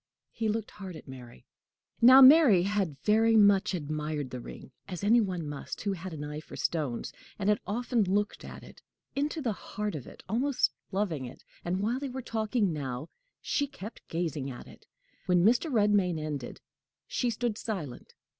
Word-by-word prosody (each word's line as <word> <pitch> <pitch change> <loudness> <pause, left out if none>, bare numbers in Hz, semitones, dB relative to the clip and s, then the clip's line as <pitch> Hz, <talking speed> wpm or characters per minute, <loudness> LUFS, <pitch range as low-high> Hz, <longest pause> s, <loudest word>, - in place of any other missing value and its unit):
He 225 -1 -2
looked 215 0 -2
hard 190 -3 -8
at 155 - -11
Mary. 125 -2 -11 0.6
Now, 260 +3 +10
Mary 260 - +8
had 195 -7 -1
very 225 +1 +4
much 200 -2 +5
admired 150 -3 -3
the 125 - -5
ring, 125 - -10 0.2
as 180 0 -6
any 230 +4 +5
one 180 -6 -3
must 145 -1 -6
who 200 - -1
had 185 0 -7
an 150 -2 -6
eye 150 0 -5
for 155 - -11
stones; 145 -8 -2 0.2
and 200 0 0
had 210 - +3
often 235 +2 0
looked 205 +1 0
at - - -9
it - - -14 0.3
into 295 +2 -1
the 235 - +1
heart 210 +1 -5
of 145 -6 -6
it - - -13
almost 255 +6 +1 0.2
loving 185 -9 -1
it; 125 - -11 0.2
and 180 +2 -1
while 235 +5 0
they 280 -1 -4
were 260 0 -6
talking 220 -4 0
now, 140 0 -5 0.3
she 285 - 0
kept 230 -6 -10
gazing 160 -5 -2
at 120 -2 -8
it. - - -16 0.4
When 180 -1 +4
Mr. 245 +8 +3
Redmain 205 -6 +3
ended, 150 -5 -5 0.4
she 245 - -1
stood 235 -1 -1
silent. 185 - -6
195 Hz, 180 wpm, -29 LUFS, 155-225 Hz, 0.6 s, Now